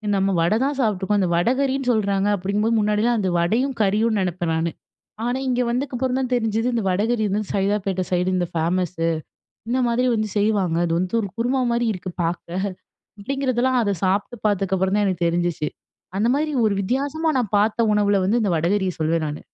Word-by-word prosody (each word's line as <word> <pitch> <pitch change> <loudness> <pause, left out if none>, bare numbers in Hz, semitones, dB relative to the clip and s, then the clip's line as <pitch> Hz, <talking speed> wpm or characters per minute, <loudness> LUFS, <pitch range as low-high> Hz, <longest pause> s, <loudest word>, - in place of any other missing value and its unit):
நம்ம 195 0 +1
வடை 170 +6 +2
தான் 285 +2 0
சாப்பிட்டுருக்கோம். 205 -4 +1
அந்த 185 -3 +1
வடகறின்னு 260 +7 +1
சொல்றாங்க. 200 -3 +1
அப்படிங்கும்போது, 205 +4 0
முன்னாடிலாம் 210 +3 +2
அந்த 190 -2 0
வடையும், 235 +11 +1
கறியும் 215 +2 +2
நினைப்பேன் 175 -2 -1
நானு. 165 +1 0 0.5
ஆனா 245 +2 0
இங்க 250 -1 +1
வந்ததுக்கப்புறம் 255 +1 -1
தான் 260 -1 -2
தெரிஞ்சது. 225 -1 0
இந்த 230 - 0
வடகரி 215 +5 +1
வந்து, 205 +2 0
சைதாப்பேட்டை 195 -1 0
சைடு 180 +1 +1
இந்த 175 -1 0
ஃபேமஸு. 165 0 0 0.6
இந்த 255 +2 +1
மாதிரி 245 +2 +1
வந்து 215 -1 -1
செய்வாங்க. 200 -5 +1
அது 165 - -1
வந்து 185 +5 -1
ஒரு 200 - -4
குருமா 255 +3 +1
மாரி 235 0 +1
இருக்கு 185 -1 -6
பாக்க. 170 +1 -3 0.7
அப்படிங்கிறதெல்லாம் 260 0 0
அதை 200 -2 0
சாப்பிட்டு 200 +5 0
பார்த்ததுக்கப்புறம் 190 -1 +1
தான் 210 - +2
எனக்கு 180 -3 0
தெரிஞ்சுச்சு. 170 -2 0 0.5
அந்த 220 +3 +2
மாரி 305 +2 0 0.2
ஒரு 205 - +1
வித்தியாசமா 280 +9 -1
நான் 235 -6 -2
பாத்த 215 +2 +1
உணவுல 205 -1 +2
வந்து 225 +5 +2
இந்த 205 - +1
வடகரியை 185 +3 +1
சொல்வேன் 160 +1 +1
நானு. 150 - -6
205 Hz, 170 wpm, -22 LUFS, 185-240 Hz, 0.7 s, வடை